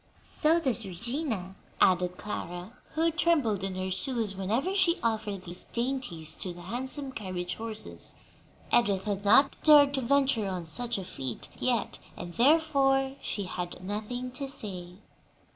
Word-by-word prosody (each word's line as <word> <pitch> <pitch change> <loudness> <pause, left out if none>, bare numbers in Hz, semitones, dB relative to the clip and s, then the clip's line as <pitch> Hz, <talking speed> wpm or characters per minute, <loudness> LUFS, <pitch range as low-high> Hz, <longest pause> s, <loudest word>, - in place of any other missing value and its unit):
"So 320 +2 +2
does 255 -7 0
Regina," 215 - -3 0.3
added 180 0 +3
Clara, 180 -1 -5 0.2
who 330 +1 +3
trembled 295 - +2
in 195 -1 -2
her 185 0 -2
shoes 230 -1 -2
whenever 225 - 0
she 375 -3 +3
offered 215 -4 -1
these 175 0 -1
dainties 235 - -2
to 180 -2 -5
the 175 - -10
handsome 260 +7 -3
carriage 185 -6 -4
horses. 220 -1 -3 0.6
Edith 205 -5 +3
had 205 -2 -2
not 255 +8 +6
dared 290 -2 +8
to 270 - 0
venture 260 -4 +2
on 180 -3 -3
such 240 +7 +1
a 190 - -5
feat 130 -8 -5
yet, 240 -4 0 0.2
and 175 - -7
therefore 270 - +3
she 205 - -2
had 180 -1 -5
nothing 220 +6 -4
to 275 +2 -4
say. 185 -9 -6
220 Hz, 145 wpm, -29 LUFS, 185-270 Hz, 0.6 s, dared